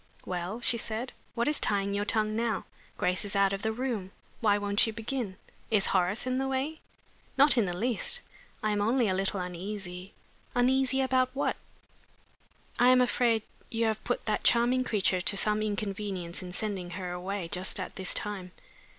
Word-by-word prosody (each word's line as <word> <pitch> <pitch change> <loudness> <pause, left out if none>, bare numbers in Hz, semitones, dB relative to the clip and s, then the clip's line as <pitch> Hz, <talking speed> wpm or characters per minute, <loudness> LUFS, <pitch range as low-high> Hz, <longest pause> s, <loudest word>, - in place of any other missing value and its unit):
"Well?" 180 +5 -3
she 235 -1 +4
said. 225 +4 -2 0.2
"What 235 +1 +1
is 300 - +2
tying 200 -1 +2
your 205 +1 0
tongue 215 0 +1
now? 225 -3 -1 0.3
Grace 180 -2 +1
is 205 0 -2
out 200 0 +4
of 195 - -3
the 220 - 0
room; 225 -5 -3 0.3
why 205 -3 +3
won't 205 +1 +2
you - - -1
begin? 225 -3 -3 0.3
Is 210 -3 +3
Horace 190 +5 +1
in 255 0 0
the 270 - 0
way?" 270 +4 -2 0.6
"Not 280 +1 +6
in 235 -4 +3
the 175 -1 -3
least. 240 - +1 0.4
I 215 - +2
am 205 0 +1
only 235 +3 +3
a 190 - +1
little 195 +1 0
uneasy 180 +1 -5 0.2
" - - -31
"Uneasy 265 +2 +3
about 255 -1 +2
what?" 280 - 0 1.2
"I 245 +1 +6
am 255 0 +6
afraid 240 -3 +2 0.3
you 230 0 0
have 220 -1 -1
put 245 - -2
that 215 - 0
charming 245 +2 +4
creature 195 -6 +1
to 200 +3 0
some 210 +1 +3
inconvenience 200 -4 -3
in 180 -1 -7
sending 195 -3 -3
her 180 -2 -4
away 180 +1 -3
just 185 +2 -1
at 185 - -5
this 190 -1 +1
time." 190 -3 -3
210 Hz, 185 wpm, -29 LUFS, 190-240 Hz, 1.2 s, Not